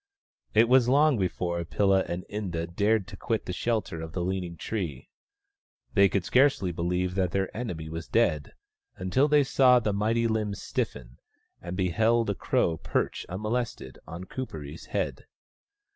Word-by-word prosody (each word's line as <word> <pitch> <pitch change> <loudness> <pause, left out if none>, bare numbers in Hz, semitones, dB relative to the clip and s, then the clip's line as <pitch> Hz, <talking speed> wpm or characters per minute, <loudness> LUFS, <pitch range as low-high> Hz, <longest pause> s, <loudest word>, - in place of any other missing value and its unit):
It 115 +2 +6
was 125 -1 +5
long 145 -2 +4
before 85 -2 -1
Pilla 95 +2 +2
and 85 +1 -4
Inda 90 -6 -3
dared 105 0 +2
to - - -9
quit - - -2
the - - -4
shelter 110 -8 -2
of 80 0 -7
the 90 - -2
leaning 90 -2 -3
tree. 85 - -4 0.8
They 100 -2 +5
could 95 -2 -1
scarcely 130 -9 +3
believe 90 +2 -1
that 95 -2 +1
their 95 +1 -2
enemy 90 -9 -4
was 80 +1 -6
dead, 85 -11 +1 0.4
until 110 +11 +1
they 150 -1 +5
saw 125 -1 +5
the 110 -3 -1
mighty 115 +3 +1
limbs 105 -3 -1
stiffen, - - -4 0.4
and 90 +1 -6
beheld 110 +5 +2
a - - 0
crow 85 -3 0
perch, - - -2
unmolested, 105 - -3
on 85 +3 -7
Kuperee's 80 - -7
head. - - -3
95 Hz, 155 wpm, -27 LUFS, 85-115 Hz, 0.8 s, It